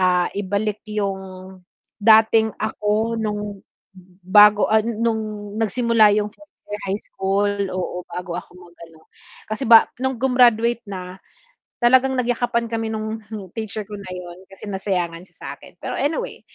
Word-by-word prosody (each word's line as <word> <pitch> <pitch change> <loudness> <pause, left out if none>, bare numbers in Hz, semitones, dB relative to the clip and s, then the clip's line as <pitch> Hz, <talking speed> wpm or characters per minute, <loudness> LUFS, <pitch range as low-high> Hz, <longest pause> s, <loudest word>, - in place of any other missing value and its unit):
ah, 180 -1 +3
ibalik 205 +1 -2
yung 200 -2 -2 0.8
dating 220 0 +5
ako 215 +1 -1
nung 210 -2 -4 0.6
bago, 210 +2 +7
ah, 220 - +6
nung 220 -2 -2
nagsimula 225 -1 +4
yung 210 0 0
4th 305 +6 -19 0.2
year 205 0 -5
high 195 +2 0
school, 195 +1 -1 0.2
oo 180 -1 -3
bago 180 -1 -6
ako 180 - -19
mag-ano 170 -2 -16 0.5
kasi 215 +5 -3
ba 230 -1 +9 0.2
nung 265 0 -1
grumaduate 240 -3 +3
na 185 -1 -7 0.6
talagang 260 +2 +4
nagyakapan 240 -1 0
kami 225 -1 -1
nung 220 +1 -4 0.4
teacher 215 -1 -4
ko 210 - -15
na 195 - -10
'yon 180 0 -8
kasi 195 - -12
nasayangan 180 -4 -2
siya - - -24
sa - - -10
akin. - - -16
Pero - - -4
anyway, 295 +3 -2
210 Hz, 140 wpm, -21 LUFS, 195-225 Hz, 0.8 s, ba